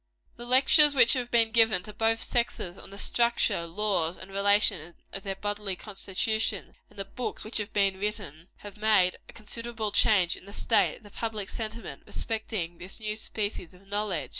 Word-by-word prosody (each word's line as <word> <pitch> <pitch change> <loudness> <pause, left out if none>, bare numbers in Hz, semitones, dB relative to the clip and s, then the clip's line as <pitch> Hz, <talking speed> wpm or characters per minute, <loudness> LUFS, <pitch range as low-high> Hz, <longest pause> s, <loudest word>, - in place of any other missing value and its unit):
The 240 - -10
lectures 280 +3 +7
which 245 -3 +7
have 250 -3 -2
been 230 -2 +3
given 220 -5 +4
to 210 - -9
both 225 +1 +1
sexes 235 -7 -1
on - - -11
the 200 - -11
structure, 235 -7 +1
laws 175 -2 -1
and 190 +1 -11
relations 200 -4 +1 0.2
of 195 - -3
their 195 0 -4
bodily 205 0 -3
constitution, 210 +1 -2
and - - -22
the 195 - -3
books 245 +5 -5
which 215 - -2
have 210 -1 -3
been 195 -2 +1
written, 195 -6 -5 0.2
have 205 0 -9
made 210 -4 +3
a - - -12
considerable 230 0 -4
change 200 -5 +4
in - - -13
the 200 - -10
state 225 - +1
of - - -22
the 205 - -14
public 215 -3 -4
sentiment 220 -9 -6
respecting 210 -6 -4
this 185 +5 -6 0.3
species 205 -5 -4
of 185 +2 -20
knowledge. 195 -9 -2
210 Hz, 180 wpm, -27 LUFS, 190-225 Hz, 0.3 s, lectures